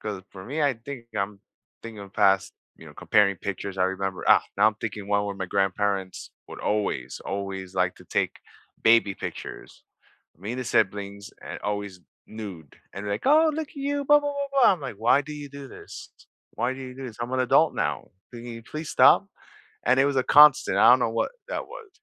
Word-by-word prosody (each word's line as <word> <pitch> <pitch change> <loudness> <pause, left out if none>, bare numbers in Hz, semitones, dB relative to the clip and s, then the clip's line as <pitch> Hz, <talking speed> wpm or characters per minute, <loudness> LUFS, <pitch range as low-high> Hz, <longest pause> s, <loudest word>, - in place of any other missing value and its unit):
'Cause 100 -3 -5
for 95 -1 -11
me, 150 +5 -4
I 140 -3 +2
think 120 +1 -9
I'm 100 0 -3 0.4
thinking 115 -2 -9
of 100 -1 -11
past, 95 -1 +2 0.2
you - - -14
know, - - -13
comparing 100 -2 +2
pictures, 100 0 -5
I 90 - +3
remember 95 0 -3
Ah, - - +7
now 105 +2 +5
I'm 110 - +2
thinking 105 -3 -5
one 100 0 +1
where 100 -1 -4
my 95 -1 -5
grandparents 95 0 -1 0.2
would - - -9
always, 100 -12 -2
always 95 -1 -5
like 90 -1 +1
to - - -16
take - - -1 0.5
baby 110 -3 +4
pictures. - - -8 0.5
Me 100 +6 -5
and 130 - -4
the - - -4
siblings 100 -2 -1
and - - -7
always 100 -2 -4 0.3
nude, 95 -9 -9 0.2
and 95 - -7
they're 100 - -2
like, 100 - -4
"Oh, 310 +3 +5
look 310 -1 -4
at - - -20
you, 285 +1 -2
blah, 295 +1 +6
blah, 290 0 -2
blah, 280 0 -3
blah." - - +7
I'm 180 - -4
like, 135 -7 -6
"Why 120 +6 +3
do 150 +2 -9
you 145 -1 -8
do 140 -1 -10
this? - - -11 0.4
Why 125 - -1
do 130 - -9
you 130 -1 -8
do 135 0 -7
this, 115 -4 -10
I'm 120 +2 -4
an 130 - +1
adult 125 - +3
now, - - -2 0.2
can 120 -1 -9
you 115 -1 -8
please 155 +6 -7
stop?" - - +6 0.6
And 130 +1 +4
it 135 - +5
was 140 -1 0
a 130 - +2
constant, 150 0 +6
I - - +7
don't 125 - +6
know 115 - +1
what 115 - -1 0.2
that - - -4
was, 440 - -11
110 Hz, 220 wpm, -25 LUFS, 100-135 Hz, 0.6 s, Ah